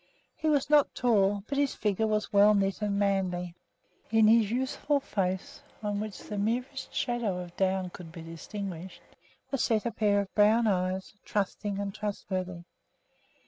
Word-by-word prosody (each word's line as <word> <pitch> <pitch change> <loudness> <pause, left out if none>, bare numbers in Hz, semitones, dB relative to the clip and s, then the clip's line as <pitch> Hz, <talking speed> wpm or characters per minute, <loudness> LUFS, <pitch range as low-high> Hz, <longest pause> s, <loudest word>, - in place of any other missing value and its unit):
He 315 - -3
was 290 -3 +2
not 295 -1 +4
tall, 205 -4 +2
but 280 0 -1
his 285 -2 +1
figure 210 +1 0
was 215 -1 -1
well 205 +1 +6
knit 195 0 0
and 205 -1 0
manly. 185 -3 0 0.6
In 225 -1 +5
his 220 -1 +5
youthful 265 +4 0
face, 190 -7 -3 0.2
on 205 -1 -1
which 215 -1 -5
the 210 -1 -6
merest 250 +6 -2
shadow 240 -6 -1
of 175 -1 -7
down 190 -1 0
could 170 -2 -10
be 165 0 -9
distinguished, 180 +2 -7 0.5
was 275 - 0
set 220 -1 +1
a 235 - 0
pair 205 -1 +2
of 200 -1 -4
brown 220 +3 +5
eyes, 185 -1 0
trusting 205 0 -2
and 200 -1 -3
trustworthy. 185 -4 -4
205 Hz, 160 wpm, -29 LUFS, 190-225 Hz, 0.6 s, well